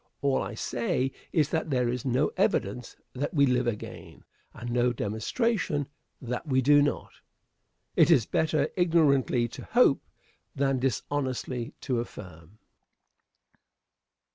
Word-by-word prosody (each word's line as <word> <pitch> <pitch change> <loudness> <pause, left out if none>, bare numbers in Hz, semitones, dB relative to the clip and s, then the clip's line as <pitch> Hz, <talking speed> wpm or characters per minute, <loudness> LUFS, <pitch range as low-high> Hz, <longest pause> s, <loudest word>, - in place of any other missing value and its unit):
All 140 -1 +2
I - - -5
say 125 +2 -1 0.2
is 155 -3 +2
that 160 0 -1
there 125 -3 +1
is 125 +1 -3
no 125 -1 +1
evidence 115 +5 -1 0.2
that 145 +5 -3
we 140 -1 +5
live 125 -1 +1
again, 110 -3 -6 0.3
and 120 +1 -7
no 120 0 +2
demonstration 145 - -1 0.3
that 125 +4 -5
we 130 -2 +2
do 145 +3 +5
not. 145 - -1 0.8
It - - +5
is 115 - +5
better 155 +4 +1
ignorantly 145 -9 +3
to - - -9
hope 235 - +4 0.5
than 135 -1 +1
dishonestly 130 -1 -2
to 125 -4 -1
affirm. 90 -5 -9
130 Hz, 125 wpm, -28 LUFS, 120-145 Hz, 0.8 s, we